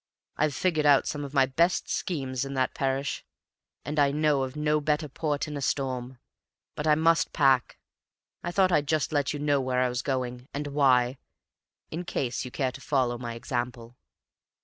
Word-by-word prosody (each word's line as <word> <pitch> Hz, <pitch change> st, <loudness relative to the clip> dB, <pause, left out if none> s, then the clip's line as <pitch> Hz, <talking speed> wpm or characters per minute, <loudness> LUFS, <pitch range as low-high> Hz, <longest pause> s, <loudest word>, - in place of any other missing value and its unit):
I've 150 Hz, -3 st, 0 dB
figured 155 Hz, -3 st, +1 dB
out 140 Hz, -1 st, +5 dB
some 150 Hz, -1 st, -3 dB
of 140 Hz, -, -6 dB
my 135 Hz, -1 st, +5 dB
best 170 Hz, +7 st, +1 dB
schemes 135 Hz, -7 st, -2 dB
in 135 Hz, 0 st, -5 dB
that 130 Hz, -1 st, 0 dB
parish, 135 Hz, +1 st, -2 dB, 0.6 s
and 150 Hz, +2 st, -2 dB
I 140 Hz, -1 st, +5 dB
know 150 Hz, -1 st, +2 dB
of 130 Hz, +1 st, -3 dB
no 150 Hz, 0 st, +1 dB
better 150 Hz, +1 st, 0 dB
port 150 Hz, +1 st, -2 dB
in 150 Hz, -, -5 dB
a 140 Hz, -, -4 dB
storm. 130 Hz, -2 st, -2 dB, 0.6 s
But 150 Hz, -, -3 dB
I 150 Hz, -, +6 dB
must 165 Hz, +1 st, +2 dB
pack. 135 Hz, -5 st, +3 dB, 0.6 s
I 175 Hz, -, -3 dB
thought 185 Hz, 0 st, +3 dB
I'd 150 Hz, -4 st, +2 dB
just 155 Hz, -1 st, 0 dB
let 145 Hz, -3 st, +1 dB
you 145 Hz, -, -3 dB
know 145 Hz, -1 st, +1 dB
where 130 Hz, -1 st, 0 dB
I 130 Hz, -, +2 dB
was 125 Hz, 0 st, -2 dB
going, 125 Hz, -2 st, -3 dB
and 145 Hz, +1 st, -2 dB
why, 130 Hz, -3 st, +3 dB, 0.7 s
in 165 Hz, +3 st, -4 dB
case 130 Hz, -7 st, -2 dB
you 125 Hz, -, -6 dB
cared 130 Hz, 0 st, -2 dB
to 135 Hz, -, -10 dB
follow 125 Hz, -4 st, 0 dB
my 120 Hz, -2 st, -5 dB
example." 120 Hz, -1 st, -4 dB
140 Hz, 190 wpm, -27 LUFS, 130-150 Hz, 0.7 s, I